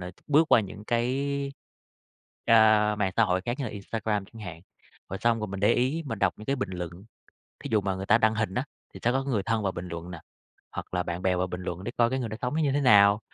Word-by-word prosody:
ờ, 90 Hz, 0 st, -6 dB, 0.2 s
bước 155 Hz, +3 st, +4 dB
qua -, -, +8 dB
những 105 Hz, +1 st, -8 dB
cái, 140 Hz, +4 st, -1 dB, 0.9 s
a, 110 Hz, -2 st, +5 dB
mạng 95 Hz, -3 st, 0 dB
xã 115 Hz, -, +5 dB
hội 95 Hz, -1 st, +1 dB
khác 120 Hz, +4 st, -3 dB
như 140 Hz, -, -2 dB
là 115 Hz, -, -4 dB
Instagram 105 Hz, 0 st, -3 dB
chẳng 110 Hz, +2 st, -13 dB
hạn. 85 Hz, -3 st, -8 dB, 0.5 s
Rồi 95 Hz, -, -4 dB
xong 115 Hz, -1 st, +2 dB
rồi 105 Hz, -, -3 dB
mình 95 Hz, 0 st, -5 dB
để 105 Hz, -, +4 dB
ý 135 Hz, +7 st, 0 dB
mình 110 Hz, -5 st, -4 dB
đọc -, -, +2 dB
những 105 Hz, -, -11 dB
cái 140 Hz, -, 0 dB
bình 100 Hz, -5 st, -3 dB
luận, 90 Hz, -2 st, -4 dB, 0.7 s
thí -, -, -3 dB
dụ 105 Hz, -, +4 dB
mà 95 Hz, -1 st, -2 dB
người 95 Hz, +1 st, -5 dB
ta 115 Hz, +3 st, +5 dB
đăng 110 Hz, 0 st, +3 dB
hình 110 Hz, -3 st, -1 dB
á, 130 Hz, -, 0 dB, 0.3 s
thì -, -, -10 dB
sẽ 120 Hz, -, +3 dB
có 135 Hz, +1 st, 0 dB
người 115 Hz, -8 st, 0 dB
thân 115 Hz, 0 st, -1 dB
vào 95 Hz, -2 st, 0 dB
bình 90 Hz, +1 st, -6 dB
luận 85 Hz, +1 st, -7 dB
nà, 85 Hz, -, -8 dB, 0.5 s
hoặc -, -, -7 dB
là 90 Hz, -, +1 dB
bạn 85 Hz, +1 st, -5 dB
bè 90 Hz, -1 st, +2 dB
vào 90 Hz, +1 st, 0 dB
bình 90 Hz, 0 st, -6 dB
luận 90 Hz, +1 st, -5 dB
để 120 Hz, -, -4 dB
coi 120 Hz, 0 st, +4 dB
cái 130 Hz, -, -1 dB
người 120 Hz, -, -3 dB
đó 110 Hz, -, -5 dB
sống 125 Hz, +4 st, -1 dB
nó 160 Hz, -, +1 dB
như 140 Hz, -2 st, +2 dB
thế 145 Hz, -, +1 dB
nào. 105 Hz, -4 st, +6 dB
105 Hz, 275 wpm, -27 LUFS, 95-120 Hz, 0.9 s, qua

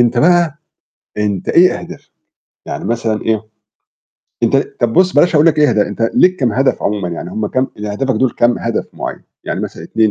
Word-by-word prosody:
أنت 120 Hz, 0 st, +1 dB
بقى 170 Hz, 0 st, +3 dB, 0.6 s
أنت 105 Hz, -3 st, -2 dB
إيه 180 Hz, +2 st, +4 dB
أهدافك؟ -, -, -11 dB, 0.6 s
يعني -, -, -5 dB
مثلًا 115 Hz, -2 st, -1 dB
إيه؟ 110 Hz, -1 st, 0 dB, 1.0 s
أنت -, -, +3 dB
طَب 120 Hz, -1 st, -1 dB
بُصّ 185 Hz, 0 st, +3 dB
بلاش 165 Hz, +4 st, +3 dB
أقول 150 Hz, +2 st, +5 dB
لك 155 Hz, -2 st, +3 dB
إيه 150 Hz, -1 st, +5 dB
أهداف 105 Hz, -, +2 dB
أنت -, -, -5 dB
ليك 185 Hz, 0 st, +4 dB
كام 125 Hz, -8 st, 0 dB
هدف 135 Hz, +4 st, +1 dB
عمومًا 100 Hz, -3 st, -1 dB
يعني؟ 85 Hz, +1 st, -6 dB
هم 105 Hz, +3 st, -2 dB
كام 130 Hz, +4 st, -1 dB
يعني 105 Hz, 0 st, -5 dB
أهدافك 130 Hz, +4 st, -1 dB
دُول 130 Hz, +3 st, +1 dB
كام 120 Hz, +1 st, +1 dB
هدف 115 Hz, -1 st, -2 dB
معيّن؟ -, -, -6 dB, 0.2 s
يعني -, -, -3 dB
مثلًا -, -, -6 dB
2، 110 Hz, -1 st, +1 dB
120 Hz, 195 wpm, -16 LUFS, 105-150 Hz, 1.0 s, أقول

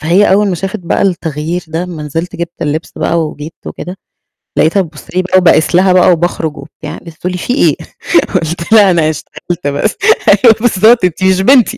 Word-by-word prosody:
فهي 180 Hz, +5 st, +3 dB
أول 205 Hz, +1 st, +3 dB
ما 185 Hz, -, -1 dB
شافت 195 Hz, +5 st, -4 dB
بقى 170 Hz, -, -1 dB
التغيير 170 Hz, -2 st, -2 dB
ده، 160 Hz, +2 st, -3 dB
أمّا 175 Hz, -4 st, -7 dB
نزلت 165 Hz, +4 st, -5 dB
جبت 170 Hz, 0 st, -6 dB
اللبس 155 Hz, +2 st, -3 dB
بقى 170 Hz, 0 st, 0 dB
وجيت 150 Hz, +1 st, -9 dB
وكده، 180 Hz, +2 st, -7 dB, 0.6 s
لقيتها 180 Hz, +5 st, +3 dB
بتبُصّ 155 Hz, -3 st, -10 dB
لي 185 Hz, -, +2 dB
بقى 185 Hz, 0 st, +1 dB
وباقيس 170 Hz, -2 st, +3 dB
لها 185 Hz, +1 st, +4 dB
بقى 180 Hz, 0 st, +5 dB
وباخرج 165 Hz, -2 st, -1 dB
وبتاع، 140 Hz, -, -9 dB
لقيتها 165 Hz, -2 st, -12 dB
بتقول 180 Hz, +3 st, -4 dB
لي: 180 Hz, -, -4 dB
"في 245 Hz, -, -2 dB
إيه؟" -, -, +2 dB, 0.6 s
قلت 170 Hz, +2 st, -2 dB
لها: 205 Hz, -4 st, +6 dB
"أنا 165 Hz, -3 st, +2 dB
اشتغلت 170 Hz, +2 st, -6 dB
بس." 145 Hz, +10 st, -1 dB, 0.3 s
أيوة 230 Hz, -3 st, +5 dB
بالضبط 225 Hz, -1 st, +3 dB
أنتِ 180 Hz, +1 st, -2 dB
مش 190 Hz, 0 st, +3 dB
بنتي. 245 Hz, +2 st, +3 dB
175 Hz, 195 wpm, -12 LUFS, 160-190 Hz, 0.6 s, لها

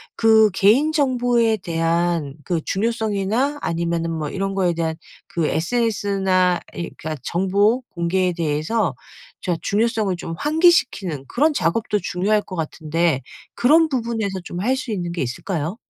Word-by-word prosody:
그 220 Hz, -1 st, +5 dB
개인 225 Hz, +11 st, +4 dB
정보에 245 Hz, -6 st, +2 dB
대한 165 Hz, -4 st, -1 dB
그 170 Hz, -3 st, -1 dB
중요성이나 220 Hz, +5 st, 0 dB
아니면은 170 Hz, 0 st, -1 dB
뭐 155 Hz, -2 st, -3 dB
이런 195 Hz, +3 st, -2 dB
거에 185 Hz, -3 st, +1 dB
대한 165 Hz, -1 st, -1 dB, 0.3 s
그 165 Hz, -3 st, -1 dB
sns나 190 Hz, -2 st, +1 dB, 0.2 s
이 170 Hz, -, -5 dB
그러니까 155 Hz, 0 st, -4 dB
정보공개에 190 Hz, -, +1 dB
대해서 165 Hz, -, 0 dB, 0.5 s
자 180 Hz, -, -1 dB
중요성을 215 Hz, -2 st, 0 dB
좀 165 Hz, -1 st, -6 dB
환기시키는 295 Hz, -, +2 dB
그런 300 Hz, +6 st, +2 dB
작업도 210 Hz, -, 0 dB
중요할 205 Hz, +3 st, 0 dB
것 185 Hz, -, -8 dB
같은데 160 Hz, -2 st, -1 dB, 0.3 s
그런 315 Hz, +6 st, +4 dB
부분에서 225 Hz, -7 st, -2 dB
좀 175 Hz, 0 st, -6 dB
할 250 Hz, +6 st, +2 dB
수 260 Hz, -3 st, -5 dB
있는 175 Hz, -4 st, -3 dB
게 170 Hz, -, -1 dB
있을까요? 160 Hz, -, -3 dB
190 Hz, 310 characters per minute, -21 LUFS, 170-230 Hz, 0.5 s, 그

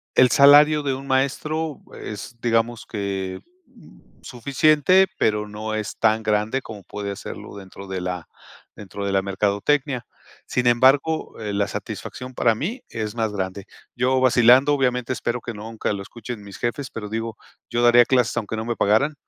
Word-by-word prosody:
el 125 Hz, -, +6 dB
salario 150 Hz, +2 st, +7 dB
de 135 Hz, -2 st, 0 dB
un 135 Hz, +1 st, -7 dB
maestro 150 Hz, +3 st, -1 dB, 0.2 s
es, 110 Hz, +3 st, -7 dB
digamos 115 Hz, 0 st, 0 dB
que, 95 Hz, -3 st, -4 dB, 0.3 s
mm, -, -, -19 dB, 0.2 s
suficiente, 155 Hz, +8 st, +3 dB
pero 105 Hz, -1 st, 0 dB
no 110 Hz, +1 st, -5 dB
es 110 Hz, -1 st, -4 dB
tan 110 Hz, 0 st, +2 dB
grande 105 Hz, +5 st, 0 dB
como 105 Hz, -5 st, -10 dB
puede 100 Hz, +2 st, -5 dB
serlo -, -, -9 dB
dentro 95 Hz, 0 st, -11 dB
de 95 Hz, -1 st, -4 dB
la 90 Hz, -2 st, -4 dB, 0.5 s
dentro 100 Hz, 0 st, -7 dB
de 100 Hz, -, -1 dB
la 95 Hz, -, +2 dB
mercadotecnia. 105 Hz, +7 st, 0 dB, 0.4 s
Sin 125 Hz, -, -1 dB
embargo, 135 Hz, +7 st, +3 dB
eh, 105 Hz, -1 st, -4 dB
la 100 Hz, 0 st, 0 dB
satisfacción 130 Hz, +5 st, -7 dB
para 115 Hz, -2 st, +2 dB
mí 215 Hz, -, -4 dB
es 110 Hz, -2 st, -4 dB
más 110 Hz, -2 st, -1 dB
grande. 95 Hz, 0 st, -4 dB, 0.3 s
Yo 130 Hz, +1 st, +2 dB
vacilando, 130 Hz, +3 st, +5 dB
obviamente 125 Hz, -2 st, 0 dB
espero 120 Hz, -1 st, -3 dB
que 120 Hz, -, -6 dB
nunca 110 Hz, +1 st, -4 dB
lo 100 Hz, -, -5 dB
escuchen 115 Hz, +2 st, -8 dB
mis 100 Hz, -1 st, -10 dB
jefes, 120 Hz, +2 st, -3 dB
pero 105 Hz, -2 st, -7 dB
digo, 115 Hz, 0 st, -4 dB, 0.3 s
yo 120 Hz, 0 st, 0 dB
daría 120 Hz, 0 st, +7 dB
clases 125 Hz, -3 st, +2 dB
aunque 110 Hz, -1 st, -2 dB
no 110 Hz, -, -4 dB
me 120 Hz, 0 st, -2 dB
pagaran, 110 Hz, +9 st, +2 dB
115 Hz, 170 wpm, -22 LUFS, 105-130 Hz, 0.5 s, salario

